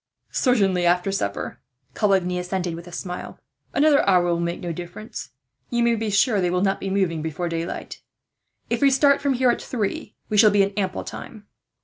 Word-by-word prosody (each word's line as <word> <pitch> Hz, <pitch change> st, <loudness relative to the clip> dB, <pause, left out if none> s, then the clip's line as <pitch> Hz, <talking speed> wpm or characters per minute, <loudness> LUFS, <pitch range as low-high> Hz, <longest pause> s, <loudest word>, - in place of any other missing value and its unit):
"Certainly 195 Hz, -8 st, +2 dB
after 180 Hz, +2 st, +2 dB
supper," 100 Hz, -, -3 dB, 0.3 s
Coligny 190 Hz, -4 st, +1 dB
assented, 180 Hz, -1 st, -2 dB
with 170 Hz, +1 st, -8 dB
a -, -, -10 dB
smile. 180 Hz, 0 st, -6 dB, 0.3 s
"Another 290 Hz, 0 st, +4 dB
hour 180 Hz, -2 st, +4 dB
will 170 Hz, -1 st, +1 dB
make 170 Hz, 0 st, -2 dB
no 175 Hz, -1 st, -4 dB
difference. 175 Hz, +6 st, -8 dB, 0.4 s
You 240 Hz, 0 st, +1 dB
may 235 Hz, 0 st, +3 dB
be 225 Hz, -1 st, -2 dB
sure 205 Hz, +1 st, +3 dB
they 180 Hz, -, +1 dB
will 180 Hz, +1 st, 0 dB
not 195 Hz, -1 st, +1 dB
be 195 Hz, -, -4 dB
moving 190 Hz, -5 st, 0 dB
before 160 Hz, +2 st, -3 dB
daylight. 165 Hz, 0 st, -5 dB, 0.7 s
If -, -, -1 dB
we 280 Hz, -, +6 dB
start 280 Hz, +1 st, +4 dB
from 280 Hz, -1 st, +1 dB
here 250 Hz, 0 st, +4 dB
at -, -, -3 dB
three, 210 Hz, -3 st, -3 dB
we 210 Hz, -, -1 dB
shall 215 Hz, +1 st, +8 dB
be 205 Hz, -1 st, +4 dB
in 195 Hz, -, -1 dB
ample 190 Hz, -2 st, -2 dB
time." 215 Hz, -3 st, -9 dB
195 Hz, 195 wpm, -23 LUFS, 175-220 Hz, 0.7 s, shall